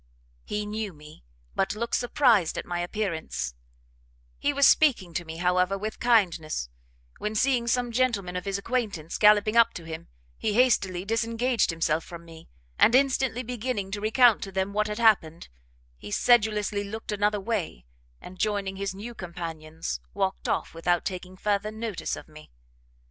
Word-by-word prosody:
He 210 0 -3
knew 210 -2 -4
me, 150 - -15 0.3
but 195 - 0
looked 235 +2 -4
surprised 240 - +3
at - - -4
my 175 0 -3
appearance; 175 - -3 0.9
he 290 - +1
was 280 -1 +5
speaking 230 - +3
to 175 +2 -3
me, 160 0 -7
however, 180 +2 +1
with 215 +2 -5
kindness, 175 - +1 0.5
when 210 +1 -3
seeing 245 0 +2
some 245 0 +1
gentlemen 225 -7 0
of 180 - -4
his 195 -1 -1
acquaintance 200 -8 -3
gallopping 210 +1 +5
up 230 0 +5
to 170 - -7
him, 160 0 -7 0.3
he 215 - 0
hastily 200 -7 +2
disengaged 230 +3 +1
himself 165 -1 0
from 170 -1 -10
me, 165 -1 -14 0.3
and 230 - +6
instantly 265 -2 +2
beginning 230 -4 -3
to 205 +1 -4
recount 225 +1 +4
to 195 - -6
them 190 +1 -2
what 210 +1 +1
had 210 0 -4
happened, 185 -8 +2 0.5
he 105 - -9
sedulously 210 - +2
looked 220 +2 -6
another 210 0 +1
way, 190 - -3 0.3
and 180 0 -12
joining 200 -2 -1
his 195 -1 -3
new 220 +5 -7
companions, 165 - -6 0.2
walked - - -1
off - - -1
without 175 +1 0
taking 185 0 -5
further 205 +1 0
notice 220 -3 -4
of - - -11
me. 155 0 -14
205 Hz, 160 wpm, -27 LUFS, 175-230 Hz, 0.9 s, and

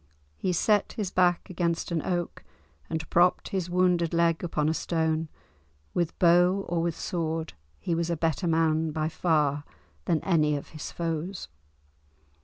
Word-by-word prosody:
He 185 - -1
set 205 +4 +2
his 210 -6 -3
back 180 -1 +2
against 170 -2 -2
an 165 -2 0
oak 175 0 -3 0.5
and 160 0 -3
propped 175 +1 +3
his 185 -3 -2
wounded 175 -2 +2
leg 170 0 +2
upon 155 -3 0
a 160 - +2
stone; 160 -1 -1 0.6
with 170 -1 -1
bow 180 +3 +4
or 170 -1 0
with 170 -1 -1
sword 165 -2 -3 0.3
he 170 - -2
was 170 0 -1
a 170 - -1
better 165 +3 0
man 160 -1 +2
by 155 0 -1
far 150 -4 +1 0.4
than 165 - +2
any 155 -5 +2
of 145 - -6
his 155 -2 -7
foes. 170 - -4
170 Hz, 155 wpm, -27 LUFS, 160-175 Hz, 0.6 s, bow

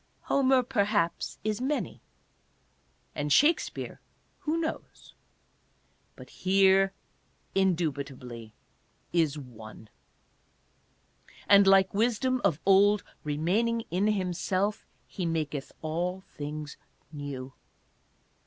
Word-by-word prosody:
Homer 265 -2 +3
perhaps 205 -7 0
is 215 +2 -1
many; 285 +3 -2 1.1
and 145 0 -3
Shakspere 295 - +2 0.2
— - - -41
who 310 +2 +1
knows? 320 -1 -5 1.0
But - - -13
here 195 0 +4 0.6
in 190 -2 +3
dubitably 130 -8 -5 0.6
is 160 -4 +2
one. 110 -5 -11 1.6
And, 200 -1 +7
like 195 -1 +5
Wisdom 245 +4 +1
of 150 - +2
old, 200 +1 +5 0.2
remaining 185 +11 0
in 190 +4 +1
him 190 -4 0
self, 190 +4 -1 0.2
he 185 - -6
maketh 150 -4 -3
all 175 +4 -2
things 150 0 -6 0.3
new. 140 -3 -6
185 Hz, 95 wpm, -28 LUFS, 150-210 Hz, 1.6 s, And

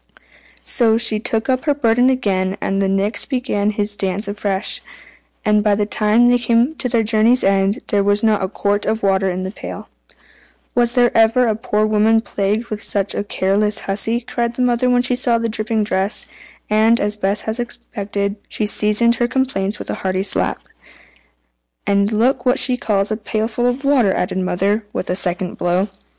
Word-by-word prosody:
So 225 -3 +2
she 230 -2 +2
took 220 0 -2
up 255 +1 0
her 290 -2 +2
burden 245 -1 +3
again, 195 -7 0
and 195 0 -1
the 195 - +1
Nix 200 +2 -1
began 250 -6 -1
his 210 0 -1
dance 195 +1 -2
afresh, 200 -1 -2 0.6
and 210 0 +3
by 210 -1 +3
the 205 0 0
time 215 +3 +2
they 245 0 +4
came 235 +4 +2
to 250 - -1
their 230 -2 +2
journey's 225 +3 +3
end, 195 +1 +1
there 200 -1 +2
was 205 +1 +1
not 215 -3 +2
a - - 0
quart 205 0 -1
of 220 -1 -1
water 195 -1 +2
in 185 +1 -3
the 190 - -4
pail. - - -8 0.8
"Was 240 0 +1
ever 240 0 +4
a 220 -2 +1
poor 215 -2 0
woman 215 +1 +3
plagued 215 +1 -2
with 215 0 -4
such 200 -1 -2
a - - -2
careless 205 +1 0
hussy?" 220 +4 -2
cried 235 -1 -3
the 250 - 0
mother 245 0 +2
when 245 0 +3
she 250 0 +1
saw 245 -2 +1
the 230 0 -1
dripping 220 0 -1
dress; 195 0 -1 0.4
and, 220 +2 +3
as 210 0 -1
Bess 205 0 -1
had 220 +2 -4
expected, 205 -4 -4
she 215 - -2
seasoned 210 +3 +2
her 240 - +1
complaints 220 -6 -1
with - - -6
a - - -6
hearty 190 0 -1
slap. 195 - -1 1.2
"And 200 +1 +2
look 245 +4 +1
what 250 +1 +2
she 255 - +4
calls 210 -4 0
a 215 - -1
pailful 220 +2 -2
of 250 +3 -2
water!" 260 -8 +3
added 185 0 -1
the - - -1
mother, 200 +4 0
with 185 - -3
a - - 0
second 180 -1 -2
blow. 180 +3 0
215 Hz, 190 wpm, -18 LUFS, 200-235 Hz, 1.2 s, they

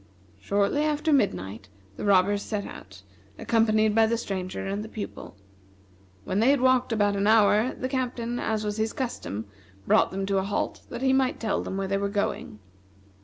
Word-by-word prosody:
Shortly 200 +8 +1
after 305 0 +1
midnight 105 - -1 0.3
the - - -5
robbers 200 +1 +3
set 205 -2 -3
out, 95 -1 -11 0.3
accompanied 220 -2 +2
by 225 0 +4
the 230 +1 0
Stranger 190 -5 -4
and 200 +2 -3
the 220 - -9
Pupil. 210 - -7 0.9
When 190 - -1
they 230 +4 +4
had 280 -1 +4
walked 255 -1 +3
about 205 -2 +2
an 200 +1 +1
hour, 220 +2 +4
the 255 - -3
Captain, 245 -2 -2
as 215 -1 -1
was 210 0 -2
his 220 0 -1
custom, 110 - -4 0.4
brought - - +4
them 195 0 -3
to 195 0 +1
a - - -1
halt 200 +1 -2
that 240 +2 -6
he 265 0 +3
might 265 -1 +1
tell 220 -3 -1
them 190 - -5
where 195 0 -2
they 195 +1 0
were 200 0 -1
going. 200 - -2
210 Hz, 185 wpm, -26 LUFS, 195-240 Hz, 0.9 s, by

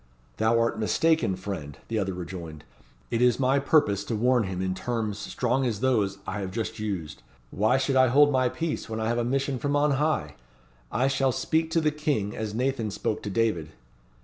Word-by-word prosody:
"Thou 110 +1 +3
art 115 -1 0
mistaken, 160 - +2
friend," 90 -7 -6
the 115 -1 -1
other 95 -2 -2
rejoined. 85 -4 -7 0.5
"It 115 - 0
is 125 -1 +4
my 135 +1 +3
purpose 120 -9 +2
to 115 - -2
warn 120 +1 +2
him 95 -1 -4
in 95 0 -1
terms 110 -1 -3
strong 125 +5 -1
as 115 -5 -1
those 105 -6 +1
I 105 - -3
have 95 -2 -3
just 110 +2 -4
used. 95 -8 -4 0.3
Why 110 +6 +2
should 135 0 0
I 130 0 +6
hold 145 +4 +5
my 130 -2 +2
peace 160 -5 -3
when 110 0 -3
I 110 - -1
have 120 0 0
a - - +1
mission 135 +1 -1
from 145 +2 0
on 145 0 +3
high? 150 - 0 0.6
I 125 +5 +2
shall 135 -1 +2
speak 160 +5 0
to 165 - +3
the 155 -1 +2
King 145 -9 -1
as 110 -1 -4
Nathan 125 -2 0
spoke 105 +1 -2
to 105 - -5
David." 95 -8 0
115 Hz, 200 wpm, -26 LUFS, 100-135 Hz, 0.6 s, I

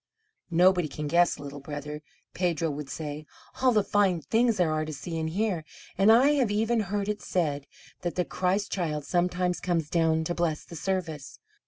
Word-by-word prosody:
"Nobody 180 0 +4
can 150 +1 -6
guess, 175 +3 +3
Little 145 -1 -8
Brother," 150 +1 -6 0.3
Pedro 170 -3 0
would 145 -1 -6
say; 150 0 -6 0.3
"all 260 -1 +5
the 215 -3 +3
fine 195 -4 +2
things 230 +6 +2
there 175 -4 +2
are 155 0 0
to 155 - -5
see 160 +3 -6
and 160 0 -1
hear; 190 -2 -1 0.3
and 195 +3 +5
I 250 +5 +6
have 245 -5 +2
even 220 +3 +1
heard 205 0 -2
it 210 0 -2
said 145 -5 -1 0.3
that 175 - -3
the 180 - 0
Christ 190 +3 -1
Child 155 -6 -2
sometimes 180 0 0
comes 165 -4 -1
down 160 -1 +2
to 175 - -2
bless 170 -3 -1
the 170 - -10
service. 160 -3 -3
175 Hz, 185 wpm, -27 LUFS, 155-195 Hz, 0.3 s, I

